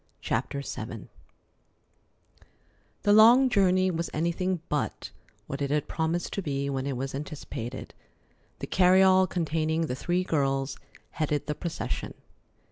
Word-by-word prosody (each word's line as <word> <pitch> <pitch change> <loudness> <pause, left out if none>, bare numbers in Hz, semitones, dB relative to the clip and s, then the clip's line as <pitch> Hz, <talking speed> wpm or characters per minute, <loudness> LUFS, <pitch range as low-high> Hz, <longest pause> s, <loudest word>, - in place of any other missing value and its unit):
CHAPTER 140 0 -2
VII 110 -4 -6 1.9
The 205 - +4
long 235 +5 +7
journey 185 -4 +3
was 170 -1 -3
anything 170 +3 0
but 150 - -3 0.3
what 140 - -6
it 140 - 0
had 150 0 0
promised 165 +2 -2
to 200 - -2
be 140 -4 -2
when 135 0 -2
it 135 -3 -2
was 135 +2 -4
anticipated. 135 -4 -6 0.6
The - - -5
carryall 185 0 +5
containing 160 -2 -1
the 155 -6 -1
three 175 +6 0
girls 135 -4 -1 0.3
headed 150 -2 -1
the 150 - -2
procession. 170 +2 -4
160 Hz, 125 wpm, -27 LUFS, 140-185 Hz, 1.9 s, long